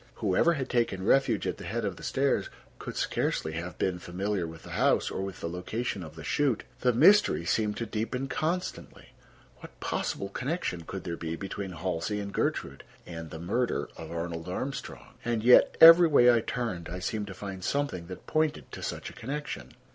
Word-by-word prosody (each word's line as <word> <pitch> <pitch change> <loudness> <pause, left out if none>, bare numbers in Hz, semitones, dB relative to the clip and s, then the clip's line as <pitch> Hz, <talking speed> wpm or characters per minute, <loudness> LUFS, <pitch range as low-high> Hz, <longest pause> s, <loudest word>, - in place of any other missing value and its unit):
Whoever 160 - +2
had 140 -5 -3
taken 115 -6 0
refuge 120 -2 +3
at - - -2
the - - -9
head - - -2
of - - -2
the - - -13
stairs - - 0 0.3
could - - -6
scarcely 80 - -1
have 85 +3 -5
been 90 -1 -1
familiar 90 +1 -2
with 80 0 -10
the - - -10
house, - - +2
or - - -3
with 95 -1 -6
the - - -2
location 95 +5 -3
of 80 -2 -9
the 80 - -9
chute. 135 - +1 0.2
The 125 - +3
mystery 155 - +5
seemed 105 +3 0
to 115 - -2
deepen 115 +5 -3
constantly. 170 +6 -3 0.5
What - - -13
possible 100 - -2
connection 125 - -3
could 95 +3 -6
there 85 -2 -4
be 80 0 -4
between 95 +1 -5
Halsey 90 +3 -2
and 100 -1 -5
Gertrude, - - -2 0.2
and 80 -2 -7
the 80 - -7
murder 115 +9 -1
of 80 -1 -9
Arnold 85 0 -4
Armstrong? 130 +9 -6
And 115 -2 -1
yet, 125 +1 +6
every 165 +1 +10
way 125 -5 +6
I 120 - +4
turned 110 -9 -3
I 90 - -4
seemed 105 +3 -3
to 95 - -8
find 95 -2 -7
something 140 -12 -1
that 90 - -9
pointed 155 -1 0
to - - -8
such - - -4
a - - -16
connection. 130 - -6
100 Hz, 195 wpm, -29 LUFS, 85-125 Hz, 0.5 s, every